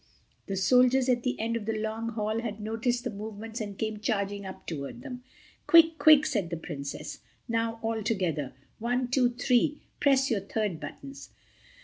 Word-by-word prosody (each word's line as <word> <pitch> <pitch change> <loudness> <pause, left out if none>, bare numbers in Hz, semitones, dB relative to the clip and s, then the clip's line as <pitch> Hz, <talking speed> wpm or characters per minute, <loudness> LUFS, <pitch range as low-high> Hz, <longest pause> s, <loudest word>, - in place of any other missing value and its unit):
The 195 - -2
soldiers 250 +6 +4
at 245 -1 +3
the 250 +1 -2
end 230 +1 -1
of 225 -3 -3
the 225 -1 0
long 220 +1 -3
hall 215 0 -1
had 220 -2 -5
noticed 230 +3 -1
the 245 - -3
movements 220 +2 -6
and 205 -2 -5
came 220 -1 -2
charging 200 -2 -2
up 190 - -9
toward 155 - -6
them. 250 0 -7 0.4
"Quick, 330 -1 +7
quick!" 305 -1 +7
said 200 -7 -1
the 170 - -3
Princess, 145 -4 -6 0.3
"now—altogether. 225 - -1 0.3
One, 245 +2 0
two, 250 -1 +3
three. 250 +4 +1 0.2
Press 270 -2 +3
your 215 - +2
third 200 -4 -2
buttons." 275 - -9
225 Hz, 160 wpm, -28 LUFS, 205-245 Hz, 0.4 s, Quick